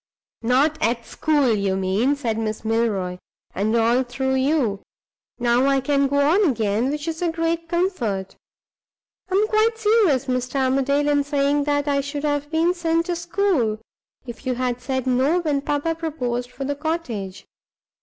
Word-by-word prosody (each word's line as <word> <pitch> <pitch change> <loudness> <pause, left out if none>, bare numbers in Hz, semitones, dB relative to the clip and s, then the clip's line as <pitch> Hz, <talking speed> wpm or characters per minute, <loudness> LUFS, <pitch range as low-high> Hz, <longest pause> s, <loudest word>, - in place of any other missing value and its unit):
"Not 270 +7 +2
at 235 +1 0
school, 290 -6 +1
you 200 -2 0
mean," 195 +9 +1
said 230 -6 -2
Miss 220 0 -3
Milroy; 210 -5 0 0.3
"and 215 +4 0
all 235 +2 +3
through 265 +1 -2
you. 265 -6 +1 0.6
Now 240 +2 +2
I 275 -1 +3
can 275 +1 +1
go 285 +1 -1
on 320 +9 +4
again, 225 0 0
which 295 +2 -4
is 325 0 -3
a 345 -2 +1
great 330 0 -2
comfort. 255 - -1 0.9
I 375 - 0
am 420 +2 +3
quite 440 +1 +2
serious, 420 - +3
Mr. 255 +1 -2
Armadale, 275 +2 +1
in 290 -1 +2
saying 285 0 +1
that 290 0 0
I 280 -1 +2
should 285 +1 -5
have 290 -1 -1
been 330 +3 +2
sent 335 -1 0
to 350 - -2
school, 340 - 0 0.5
if 240 +2 -9
you 255 - 0
had 250 -1 -2
said 260 0 -2
No 260 +7 +2
when 300 -5 0
papa 290 +3 -1
proposed 250 -7 -3
for 270 - -7
the 285 +1 -2
cottage. 245 - -4
275 Hz, 165 wpm, -22 LUFS, 240-320 Hz, 0.9 s, on